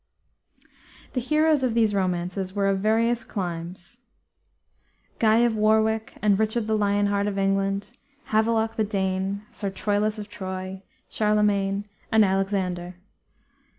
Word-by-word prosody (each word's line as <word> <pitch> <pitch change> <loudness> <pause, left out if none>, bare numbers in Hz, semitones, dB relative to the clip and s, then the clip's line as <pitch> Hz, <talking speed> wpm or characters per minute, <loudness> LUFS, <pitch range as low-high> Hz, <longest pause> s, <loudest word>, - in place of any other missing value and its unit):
The 255 - 0
heroes 305 +2 +2
of 250 -3 0
these 220 -3 +3
romances 185 0 -2
were 200 -1 +1
of 195 -1 +1
various 225 +3 +2
climes: 175 +3 -6 1.2
Guy 225 +1 +4
of 230 -2 +1
Warwick, 220 +1 +1
and 205 -1 +3
Richard 220 +1 0
the 220 0 +1
Lion 205 -1 +2
Heart 200 0 +1
of 200 -1 -2
England, 195 +1 0 0.4
Havelok 225 +1 +1
the 220 - +2
Dane, 195 -1 -1
Sir 200 - -4
Troilus 205 +2 -1
of 210 -1 -6
Troy, 190 -1 -6 0.3
Charlemagne, 205 -2 +1 0.3
and 220 -1 +6
Alexander. 190 -2 -1
205 Hz, 125 wpm, -25 LUFS, 195-220 Hz, 1.2 s, and